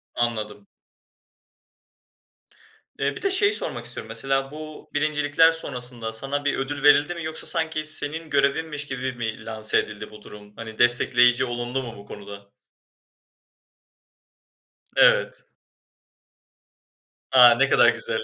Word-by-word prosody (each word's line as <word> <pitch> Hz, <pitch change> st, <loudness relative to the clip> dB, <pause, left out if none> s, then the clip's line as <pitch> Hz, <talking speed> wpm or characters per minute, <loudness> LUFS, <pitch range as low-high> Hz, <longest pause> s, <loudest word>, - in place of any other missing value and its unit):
Anladım. 120 Hz, -, -3 dB, 2.3 s
Eee, -, -, -1 dB
bir -, -, -9 dB
de 390 Hz, -, 0 dB
şeyi 405 Hz, +2 st, +3 dB
sormak 120 Hz, -, -2 dB
istiyorum 120 Hz, -2 st, -4 dB
mesela, 135 Hz, +4 st, -2 dB
bu 155 Hz, 0 st, -11 dB
birincilikler 150 Hz, +2 st, +2 dB
sonrasında 125 Hz, -7 st, -2 dB
sana 140 Hz, +5 st, -2 dB
bir 145 Hz, -, 0 dB
ödül 140 Hz, +1 st, -4 dB
verildi 145 Hz, +3 st, +4 dB
mi 170 Hz, -, -7 dB
yoksa 160 Hz, 0 st, -4 dB
sanki 160 Hz, -1 st, -1 dB
senin 155 Hz, +1 st, -1 dB
görevinmiş 150 Hz, +2 st, -1 dB
gibi 130 Hz, -2 st, -5 dB
mi 115 Hz, -2 st, -6 dB
lanse 110 Hz, -1 st, -1 dB
edildi 105 Hz, 0 st, -7 dB
bu 105 Hz, -, -14 dB
durum? 105 Hz, 0 st, -14 dB
Hani 110 Hz, -1 st, -10 dB
destekleyici 120 Hz, +1 st, +4 dB
olundu 120 Hz, +2 st, -4 dB
mu 115 Hz, -3 st, -9 dB
bu 100 Hz, -, -13 dB
konuda? 100 Hz, -1 st, -12 dB, 2.4 s
Evet. -, -, +3 dB, 1.9 s
A, 125 Hz, -2 st, +8 dB
ne 135 Hz, +3 st, +2 dB
kadar -, -, +5 dB
güzel. -, -, -2 dB
130 Hz, 120 wpm, -23 LUFS, 115-150 Hz, 2.4 s, A